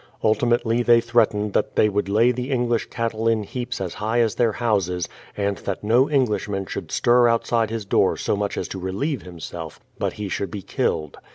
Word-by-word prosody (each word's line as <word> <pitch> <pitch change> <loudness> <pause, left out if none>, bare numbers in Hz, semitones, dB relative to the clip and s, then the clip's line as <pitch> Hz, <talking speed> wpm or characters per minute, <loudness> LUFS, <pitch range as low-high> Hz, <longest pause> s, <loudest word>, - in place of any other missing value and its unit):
Ultimately 115 +2 +2
they 120 -1 +5
threatened 110 -3 +1
that - - 0
they - - +5
would 105 -1 -1
lay 115 +5 +4
the 125 +2 -4
English 120 -3 0
cattle 115 -1 -2
in 115 -2 +2
heaps 125 +4 -5
as 95 -3 -3
high 110 +3 -1
as 115 -3 +2
their 115 -3 +1
houses, 95 -7 0 0.3
and 100 -1 0
that 100 0 -4
no 120 +6 +3
Englishman 105 -8 0
should - - -6
stir 120 0 +4
outside 115 -1 +1
his 110 -2 -4
door - - +2
so - - 0
much 100 0 -2
as - - -2
to 95 - -5
relieve 100 - -2
himself, 85 -2 -8 0.2
but - - -1
he 105 -1 -5
should 100 0 -3
be 100 +1 -6
killed. 75 -3 -2
110 Hz, 195 wpm, -23 LUFS, 100-120 Hz, 0.3 s, they